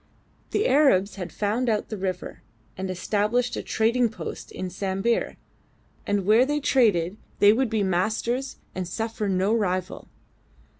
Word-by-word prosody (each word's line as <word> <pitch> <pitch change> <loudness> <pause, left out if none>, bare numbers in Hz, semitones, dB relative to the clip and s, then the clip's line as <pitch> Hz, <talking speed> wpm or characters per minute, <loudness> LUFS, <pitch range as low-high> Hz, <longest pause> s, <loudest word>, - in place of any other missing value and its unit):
The 420 - +1
Arabs 255 -9 +3
had 180 -3 -5
found 215 +7 -1
out 215 -2 0
the 215 - -3
river, 185 -1 -4 0.3
had 190 0 -4
established 210 +6 0
a - - -3
trading 235 +2 +1
post 220 - -7
in 185 -1 -5
Sambir, 195 +5 -1 0.7
and 205 -2 0
where 220 +5 +6
they 295 +3 0
traded 210 - +2 0.2
they 205 +1 +6
would 255 +1 +1
be 220 -2 0
masters 225 +8 -1 0.2
and 185 -1 -4
suffer 220 +2 -3
no 190 +3 +1
rival. 185 -4 -1
210 Hz, 145 wpm, -25 LUFS, 185-235 Hz, 0.7 s, where